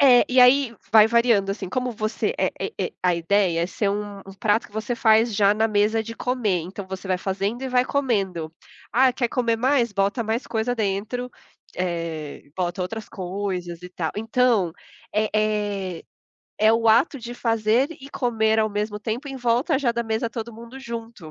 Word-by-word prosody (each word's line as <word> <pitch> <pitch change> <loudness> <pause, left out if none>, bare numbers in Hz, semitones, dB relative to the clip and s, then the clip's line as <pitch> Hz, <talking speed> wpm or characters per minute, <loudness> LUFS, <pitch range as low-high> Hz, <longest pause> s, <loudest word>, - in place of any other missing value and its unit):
É 255 -3 +7
e 255 - +5
aí 250 -1 +5 0.2
vai 220 -1 +8
variando, 230 -4 +3
assim, 195 -2 -4
como 250 +3 -1
você 215 -1 -2
é - - +2
é - - -1
e - - -8 0.2
e 450 - -22
a 180 -1 +3
ideia 170 0 +1
é - - 0
ser 200 +2 -1
um 205 0 -4
um 195 0 -12
prato 210 +2 +1
que - - -26
você 220 +3 -2
faz 225 -1 +3
já 200 0 +4
na 220 +1 +2
mesa 215 +1 +2
de 230 +1 -7
comer. 230 -8 0
Então, 185 +4 -7
você 190 0 -7
vai 185 -1 +1
fazendo 200 +6 -2
e 265 - -2
vai 250 0 +3
comendo, 195 - -1 0.4
"Ah, 255 +1 +5
quer 245 -1 -1
comer 230 -1 0
mais.", 250 0 +2
bota 200 +4 0
mais 225 +3 -2
coisa 225 +2 -1
dentro, 220 +4 -2 0.5
eh, 165 -4 -3
bota 180 +1 -2
outras 220 +4 -4
coisas 180 -3 -4
e 180 - -8
tal. 165 -3 -3
Então 225 -5 +2 0.4
é 215 0 +1
é 205 -4 -1 0.6
é 215 +1 +5
o 225 0 +2
ato 260 +6 +4
de 240 +1 -7
fazer 230 +2 +1
e 270 - -10
comer 220 -5 +1
ao 215 0 +2
mesmo 210 0 -2
tempo 230 +7 -4
em 270 - -6
volta 245 +2 +1
já 255 -4 +1
da 235 - -1
mesa 225 +1 -2
todo 235 0 -6
mundo 235 +4 -11
junto. 230 -9 -7
220 Hz, 195 wpm, -23 LUFS, 195-240 Hz, 0.6 s, vai